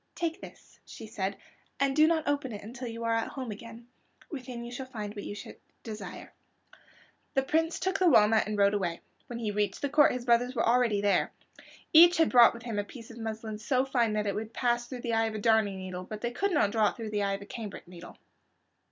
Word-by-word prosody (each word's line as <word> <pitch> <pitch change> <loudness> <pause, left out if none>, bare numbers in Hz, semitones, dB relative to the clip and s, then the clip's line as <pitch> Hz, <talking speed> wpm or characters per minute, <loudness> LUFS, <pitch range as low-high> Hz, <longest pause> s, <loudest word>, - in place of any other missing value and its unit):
"Take 335 +2 -3
this," - - -14
she - - -10
said, 200 -2 -3 0.4
"and 275 0 +1
do 310 +1 +6
not 320 -1 +1
open 285 -3 -1
it 205 -2 -7
until 240 +4 -7
you 230 0 -6
are 230 0 +1
at 225 0 0
home 260 -4 -6
again. 230 +2 -10 0.4
Within 250 -5 -6
it 240 +1 -7
you - - -3
will 260 - -13
find 210 -3 -5
what 205 -2 -7
you 205 - -5 0.5
desire." 210 -5 -8 1.0
The 270 - +3
Prince 325 +4 0
took 380 +1 -1
the 365 -2 +5
walnut 220 -4 +5
and 210 -1 -3
rode 200 0 +4
away. 175 -5 -2 0.3
When 240 - -6
he 225 -3 -2
reached 205 +4 -2
the 285 - +1
court 295 +1 +5
his 250 -1 -5
brothers 245 +2 +2
were - - +1
already 230 -4 +3
there. 205 -1 +2 0.6
Each 345 +2 +8
had 325 - +3
brought 240 -2 +7
with 235 - -10
him 225 -4 -3
a - - 0
piece 230 +3 -12
of 235 - -11
muslin 220 -1 -5
so 255 +4 +1
fine 240 -5 +1
that 210 0 -1
it 200 - 0
would 220 +2 -5
pass 240 -1 0
through 250 -1 -7
the 235 -1 -2
eye 225 0 +3
of 220 - -5
a - - -3
darning 215 -2 +2
needle, 185 -1 -6
but 210 +3 -8
they 240 - -2
could 395 +11 -1
not 290 - +2
draw 215 -2 +3
it - - -9
through 225 -2 -6
the 210 -1 -1
eye 200 0 0
of 195 - -5
a - - -12
cambric 205 -4 -8
needle. 175 0 -12
230 Hz, 240 wpm, -29 LUFS, 210-255 Hz, 1.0 s, Each